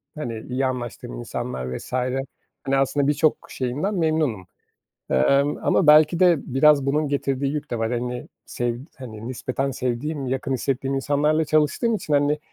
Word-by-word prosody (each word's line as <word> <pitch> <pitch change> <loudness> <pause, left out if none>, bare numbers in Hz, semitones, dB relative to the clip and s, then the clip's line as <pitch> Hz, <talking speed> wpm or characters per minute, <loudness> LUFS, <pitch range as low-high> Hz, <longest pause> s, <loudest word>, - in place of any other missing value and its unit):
hani, 120 -7 -4
iyi 130 +2 0
anlaştığım 120 - -4
insanlar 65 +1 -4
vs. - - -11 0.7
hani, 135 0 +1
aslında 140 +1 +1
birçok 150 +1 +3 0.2
şeyinden 145 +11 -2
memnunum, 155 - 0 0.6
emm, 140 - +3
ama 165 - +3
belki 155 +3 +6
de 180 -2 +6 0.2
biraz 140 0 +5
bunun 150 +2 +1
getirdiği 140 0 -1
yük 150 - -5
de 120 - -2
var. 115 +1 -1
Hani, 125 0 -3 0.2
sevd 120 0 -2 0.2
hani, 115 -3 -8
nispeten 130 +2 -2
sevdiğim, 130 +4 -3
yakın 135 +1 -2
hissettiğim 135 +1 -1
insanlarla 150 +3 +1
çalıştığım 155 +10 +2
için, 155 -7 -3
hani, 145 +1 +2
135 Hz, 150 wpm, -23 LUFS, 125-150 Hz, 0.7 s, belki